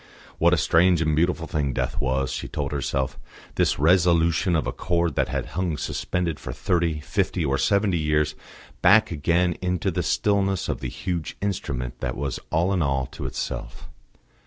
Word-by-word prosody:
What 85 +1 +5
a 90 - +4
strange 85 +3 +4
and 80 -1 +1
beautiful 85 +1 +1
thing 75 -5 -1
death 60 -1 -2
was, 65 0 0
she - - -4
told 70 -2 -3
herself 70 -3 -2 0.3
this - - +1
resolution 85 +1 +3
of 80 - +1
a - - -1
chord 85 -2 0
that - - 0
had - - -3
hung 90 -4 -1
suspended 85 -1 -2
for - - -6
thirty, 85 -4 0
fifty 90 -1 -1
or 70 0 0
seventy 100 -4 +2
years 75 -1 +1 0.5
back 110 -1 +5
again 85 +3 +1
into 90 -1 0
the - - -1
stillness 100 -5 +1
of - - -2
the 65 - -4
huge 85 +5 -4
Instrument 70 -11 -3
that 60 0 -3
was 70 -1 -3
all 85 +5 +1
in 90 - +1
all 70 -3 +1
to - - -5
itself. 60 -1 -5
80 Hz, 175 wpm, -24 LUFS, 70-90 Hz, 0.5 s, What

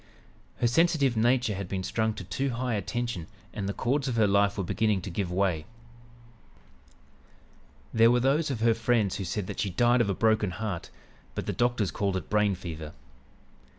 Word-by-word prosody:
Her - - 0
sensitive 140 0 +3
nature 120 0 +2
had 100 -1 -5
been 95 -1 -2
strung 110 +2 -1
to - - -7
too 95 +10 -2
high 125 0 -2
a 105 - 0
tension 120 -5 -3 0.3
and 100 -2 -3
the - - +1
chords 135 +6 0
of 125 - -1
her 110 -2 +4
life 100 0 +2
were 100 - -1
beginning 105 +2 +1
to 95 - -5
give 90 0 -2
way. 90 -4 0 2.3
"There 115 +1 +6
were 125 +1 +4
those 140 +5 +2
of 125 -5 -3
her 115 0 +4
friends 115 -3 +1
who 100 - -3
said 95 +2 -3
that - - -6
she 100 - 0
died 120 +6 +3
of 100 - +1
a 100 - 0
broken 110 -2 +2
heart, 105 -6 -4 0.5
but - - -3
the - - -2
doctors 120 -5 +1
called 100 -2 -1
it 95 - -7
'brain 105 -2 +3
fever.' 80 -4 -7
110 Hz, 190 wpm, -28 LUFS, 95-120 Hz, 2.3 s, There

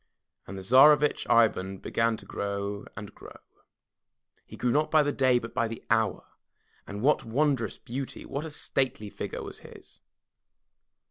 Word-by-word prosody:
And 100 - -7
the 95 - -7
Tsarevitch 145 +7 +5
Ivan 95 -4 +3
began 115 +3 0
to - - -13
grow 100 0 -4
and 105 0 -8
grow. - - -13 1.1
He - - -11
grew 125 - 0
not 150 +4 +1
by 155 -1 +4
the 145 - 0
day, 130 -3 +3
but 115 -1 -6
by 115 -2 0
the 115 0 -8
hour, 110 -4 +1 0.6
and 100 +2 -6
what 150 +3 +3
wondrous 125 -2 0
beauty, 130 +3 -6
what 140 +2 -4
a 160 - -6
stately 130 -7 -2
figure - - -6
was - - -8
his. - - -14
115 Hz, 155 wpm, -28 LUFS, 105-140 Hz, 1.1 s, Tsarevitch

